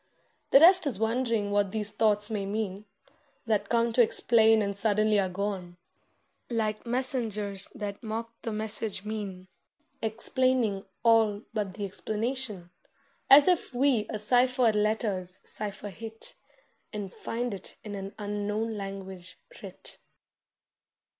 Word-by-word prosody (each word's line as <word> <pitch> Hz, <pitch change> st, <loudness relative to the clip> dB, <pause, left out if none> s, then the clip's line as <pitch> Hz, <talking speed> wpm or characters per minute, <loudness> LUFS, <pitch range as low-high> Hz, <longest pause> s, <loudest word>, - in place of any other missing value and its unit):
The 275 Hz, -, +8 dB
rest 355 Hz, +1 st, +7 dB
is 245 Hz, -8 st, -1 dB
wondering 225 Hz, -2 st, 0 dB
what 205 Hz, -1 st, +1 dB
these 210 Hz, -1 st, 0 dB
thoughts 210 Hz, -1 st, +2 dB
may 200 Hz, -2 st, -2 dB
mean, 205 Hz, -1 st, -3 dB, 0.6 s
That 220 Hz, -3 st, 0 dB
come 235 Hz, 0 st, +2 dB
to 245 Hz, -, +5 dB
explain 225 Hz, -1 st, +4 dB
and 200 Hz, 0 st, -2 dB
suddenly 215 Hz, +1 st, +2 dB
are 190 Hz, -1 st, 0 dB
gone, 185 Hz, -2 st, -4 dB, 0.7 s
Like 220 Hz, -1 st, -2 dB
messengers 225 Hz, -6 st, -2 dB
that 205 Hz, -4 st, -5 dB
mock 230 Hz, 0 st, -5 dB
the 225 Hz, -, -4 dB
message' 215 Hz, -1 st, -2 dB
mien, 200 Hz, -4 st, -5 dB, 0.5 s
Explaining 225 Hz, -2 st, 0 dB, 0.2 s
all 225 Hz, -2 st, +3 dB
but 205 Hz, -4 st, -3 dB
the 205 Hz, -, -3 dB
explanation; 210 Hz, -1 st, -4 dB, 0.6 s
As 280 Hz, +4 st, +9 dB
if 355 Hz, -7 st, +1 dB
we 250 Hz, -4 st, +2 dB
a 215 Hz, -, -3 dB
ciphered 245 Hz, +2 st, +3 dB
letter's 210 Hz, -4 st, -1 dB
cipher 205 Hz, 0 st, -4 dB
hit 225 Hz, +2 st, -10 dB, 0.6 s
And 205 Hz, -4 st, -6 dB
find 240 Hz, 0 st, -3 dB
it 195 Hz, -, -9 dB
in 210 Hz, -, -7 dB
an 195 Hz, 0 st, -6 dB
unknown 210 Hz, +2 st, -3 dB
language 190 Hz, -2 st, -8 dB, 0.2 s
writ. -, -, -12 dB
215 Hz, 125 wpm, -28 LUFS, 200-230 Hz, 0.7 s, As